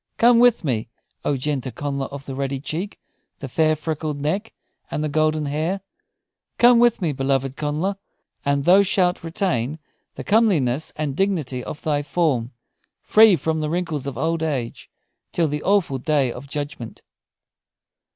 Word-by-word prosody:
Come 235 0 +6
with 245 -3 +4
me, 115 -7 -1 0.3
O 140 - 0
gentle 135 -1 -2
Connla 140 +2 -3
of 140 0 -8
the 135 - -6
ruddy 135 0 -2
cheek, 165 +8 -5 0.4
the 135 - -7
fair, 155 +4 +2
freckled 155 -1 -3
neck, 190 +10 -2 0.4
and 150 - -2
the 155 - -1
golden 155 0 +1
hair! 160 +7 -1 0.8
Come 240 0 +6
with 240 -5 +3
me, 160 - +1
beloved 135 -1 -1
Connla, 155 +7 -2 0.5
and 140 0 +1
thou 185 +6 +6
shalt 180 -3 +1
retain 160 - -1 0.4
the - - -6
comeliness 160 - +2
and 150 -3 -3
dignity 155 -10 -1
of 150 - -8
thy 145 -2 +1
form, 140 -5 0 0.5
free 215 -2 +6
from 160 -1 -1
the 155 -1 -2
wrinkles 160 -5 -2
of 135 -4 -5
old 165 +4 0
age, 135 -7 -3 0.4
till 165 -2 +1
the 150 0 -3
awful 185 -9 +1
day 140 -2 +1
of 125 +4 -9
judgment." 145 -5 -6
150 Hz, 155 wpm, -22 LUFS, 140-175 Hz, 0.8 s, Come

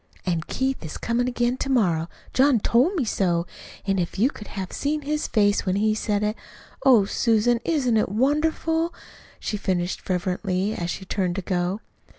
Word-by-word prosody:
"An' 170 -3 0
Keith 265 -4 -1
is 155 - -6
comin' 240 +2 0
again 245 0 0
to 275 - -3
morrow. 175 -10 +2 0.2
John 265 -2 +4
TOLD 255 - +3
me 295 -8 0
so. 175 -5 +1 0.4
An' 195 -1 +1
if 175 +1 -2
you 240 +8 +3
could 210 - -10
have 190 -2 -6
seen 300 +1 -1
his 300 +1 -1
face 205 -2 +2
when 185 -1 0
he 215 +2 +2
said 210 -1 -1
it! 210 +1 0 0.5
Oh, 245 -7 +6
Susan, 230 +3 +2
isn't 260 -9 +1
it 215 - +1
wonderful?" 320 - +1 0.4
she 210 - -3
finished 180 -2 -1
fervently, 185 +2 -1
as 170 -4 -3
she 190 - -4
turned 185 -2 -1
to 195 - -3
go. 180 +2 -1
215 Hz, 175 wpm, -24 LUFS, 185-260 Hz, 0.5 s, Oh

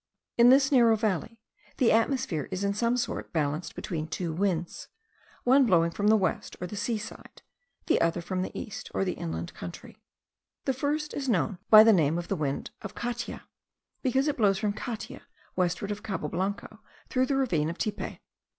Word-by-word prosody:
In 240 +1 +7
this 270 +2 +5
narrow 235 -4 +6
valley 220 +1 -2 0.4
the 250 - +4
atmosphere 230 - +1
is 190 +1 -3
in 200 0 +1
some 235 +3 +1
sort 250 - -3
balanced 155 +1 -2
between 160 -3 -4
two 165 +1 -3
winds, 175 -1 -2 0.6
one 260 +1 +5
blowing 170 -4 +3
from 205 +4 -1
the 220 - +6
west, 195 - -2
or 180 - -3
the 180 - -7
seaside, 220 +1 -5 0.4
the - - +2
other 165 +1 +2
from 185 +2 -3
the 185 - -2
east, 235 +1 -7
or 195 - +1
the 185 - 0
inland 80 +1 -5
country. 90 -1 -9 0.6
The 265 - +1
first 295 +3 -2
is 270 -2 -3
known 195 -2 0
by 215 0 +10
the 225 0 +6
name 160 -3 +2
of 175 0 -5
the 195 - +1
wind 145 -4 -3
of 200 - -8
Catia, 240 0 -4 0.6
because 265 +2 +1
it 295 - 0
blows 200 -4 +3
from 210 0 -1
Catia 220 +1 -6 0.3
westward 180 +3 0
of 205 0 -4
Cabo 195 -8 -3
Blanco 200 +4 -3 0.3
through 255 0 +1
the 275 - +1
ravine 170 - +1
of 170 - -5
Tipe. 215 - -3
205 Hz, 185 wpm, -28 LUFS, 175-240 Hz, 0.6 s, by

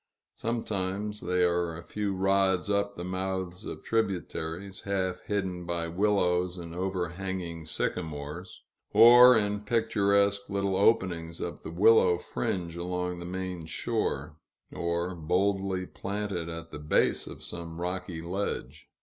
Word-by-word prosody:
Sometimes 105 -2 -2
they 90 0 +1
are 85 -2 +1
a 85 - -9
few 100 +1 -2
rods 95 0 +2
up 100 0 0
the 85 - -5
mouths 95 -1 -3
of - - -7
tributaries, 95 -3 -2
half 95 -2 -1
hidden 95 -3 -2
by 85 -1 -1
willows 90 -1 +1
and 85 -1 -7
overhanging 90 -2 -3
sycamores; 80 +2 -4 0.3
or, 120 +1 +9
in 105 -1 +1
picturesque 100 -2 +2
little 100 -1 0
openings 90 -5 +2
of 85 - -5
the - - -7
willow 90 0 +5
fringe 85 +2 -3
along 90 0 -3
the 85 - -6
main 90 -2 -4
shore; 80 -6 -2 0.4
or, 85 +1 -1
boldly 95 +3 0
planted 100 -4 -4
at 85 0 -6
the - - -6
base 75 - +1
of - - -9
some 85 -1 -7
rocky 90 -2 -4
ledge. 95 +4 -4
90 Hz, 130 wpm, -29 LUFS, 85-100 Hz, 0.4 s, or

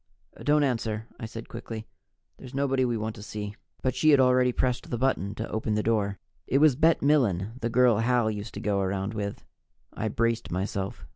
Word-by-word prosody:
"Don't 150 0 +3
answer," 115 -4 -1
I 115 - -5
said 115 +1 -8
quickly. 110 -1 -7 0.5
"There's 130 0 -10
nobody 135 -1 +1
we 120 -2 0
want 110 0 -3
to - - -9
see 105 0 -5 0.2
" - - -37
But 130 - +1
she 155 - +3
had 145 -2 +7
already 125 -1 +4
pushed 125 0 -1
the 120 - -2
button 110 -5 0
to 110 - -4
open 110 0 -1
the 105 - 0
door. 105 -3 +1 0.3
It 135 - +2
was 150 -2 +5
Bet 160 +2 +3
Milen, 115 - +2
the 115 - 0
girl 120 -2 +4
Hal 120 -1 +2
used 105 +1 -6
to - - -4
go 100 -2 0
around 95 +2 -2
with. 100 -2 -4 0.5
I 110 - -2
braced 115 +1 0
myself. 95 -2 -3
115 Hz, 205 wpm, -27 LUFS, 105-130 Hz, 0.5 s, had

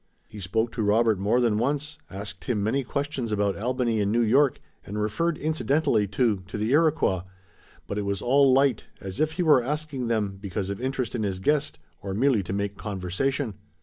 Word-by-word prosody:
He 105 - -10
spoke 110 +5 -1
to 115 - -3
Robert 110 0 +3
more 105 +5 +2
than 115 -4 +2
once, 145 +4 -1
asked 100 0 -7
him 110 -5 0
many 135 +6 +1
questions 140 -3 -3
about 100 -2 +1
Albany 120 0 0
and 100 0 +1
New 120 +2 +3
York, 135 +4 +3 0.2
and 105 +2 -5
referred 150 +11 0
incidentally, 145 -7 +1
too, 105 0 +1
to 100 - -5
the 110 +3 -1
Iroquois, 150 - +3 0.6
but 100 - -3
it - - -2
was 100 -1 -1
all 135 +4 +4
light, 135 -3 +3
as 95 +5 -6
if 155 0 +1
he 180 +2 -1
were 150 -6 +6
asking 145 -1 -3
them 105 -4 -1
because 100 -1 -3
of 100 - -5
interest 130 -2 -2
in 120 - -2
his 95 -3 -2
guest, 145 +8 +1 0.2
or 95 0 -4
merely 125 -1 +3
to 90 - -6
make 100 0 -2
conversation. 105 +6 -2
115 Hz, 195 wpm, -26 LUFS, 100-135 Hz, 0.6 s, were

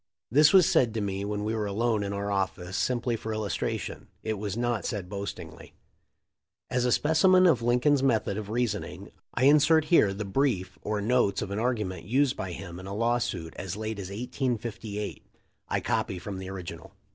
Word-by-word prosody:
This 150 +4 +6
was 185 -4 +7
said 115 -3 +3
to - - 0
me 100 -1 -2
when 105 0 -2
we 110 +1 -1
were 110 -2 -1
alone 110 +2 0
in 100 -1 -2
our 100 0 -2
office 95 -2 -2
simply 120 0 0
for 110 0 -5
illustration. 105 -2 -3 0.2
It 110 -2 -2
was 105 0 -3
not 120 -2 0
said 100 -6 -3
boastingly. 100 0 -7 1.0
As 125 -1 +1
a 125 - +2
specimen 185 +7 +5
of 150 -9 +4
Lincoln's 125 +4 +3
method 115 -6 +1
of 105 -1 -5
reasoning 115 -3 -2 0.2
I 120 - +1
insert 150 +2 +5
here 105 -12 +6
the 100 +2 -4
brief 95 -4 0
or 105 -1 -2
notes 115 -2 +2
of 100 - -6
an 100 - -2
argument 105 -8 -2
used 130 +5 +2
by 95 - -4
him 90 -1 -8
in 95 - -9
a 100 - -5
lawsuit 115 -7 -1
as 95 +1 -5
late 110 -1 -4
as 95 -2 -6
1858. 115 -2 -4 0.5
I - - +1
copy 95 - -1
from 95 +1 -6
the 95 0 -6
original. 95 -3 -8
110 Hz, 185 wpm, -28 LUFS, 100-125 Hz, 1.0 s, was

